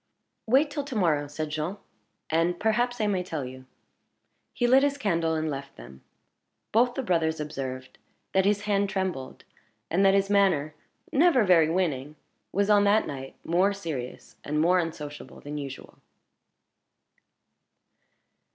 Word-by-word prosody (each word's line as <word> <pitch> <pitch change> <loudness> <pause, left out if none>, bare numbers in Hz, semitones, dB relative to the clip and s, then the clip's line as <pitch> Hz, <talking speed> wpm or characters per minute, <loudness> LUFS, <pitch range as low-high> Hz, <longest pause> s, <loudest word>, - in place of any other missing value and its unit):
"Wait 275 +6 +3
till 290 -1 -3
to 275 -3 -7
morrow," 155 -8 +1
said 150 +1 -5
Jean, 155 +6 -3 0.5
"and 170 +2 +1
perhaps 240 +3 +1
I 215 - +1
may 195 -3 +1
tell 160 -6 -4
you." 130 0 -10 0.8
He 245 - -1
lit 260 +2 +6
his 285 0 +1
candle, 170 -9 0
and 160 0 -1
left 140 -2 -5
them. 65 +2 -13 0.7
Both 245 +2 +3
the 270 - -2
brothers 165 -6 0
observed 135 -4 -6 0.3
that 190 - +4
his 205 +1 +2
hand 200 -1 +1
trembled, 185 -9 -4 0.5
and 185 +4 +3
that 195 0 +5
his 195 0 +2
manner 190 -7 +2 0.4
never 300 -4 +4
very 170 -5 +5
winning 155 -5 -1 0.4
was 200 +1 +1
on 205 -1 +5
that 210 +2 +4
night 135 -1 -7
more 185 +4 +2
serious 155 -11 -7
and 150 +1 -1
more 180 +3 +4
unsociable 150 -3 -6
than 150 +1 -6
usual. 135 -2 -9
175 Hz, 145 wpm, -27 LUFS, 150-205 Hz, 0.8 s, lit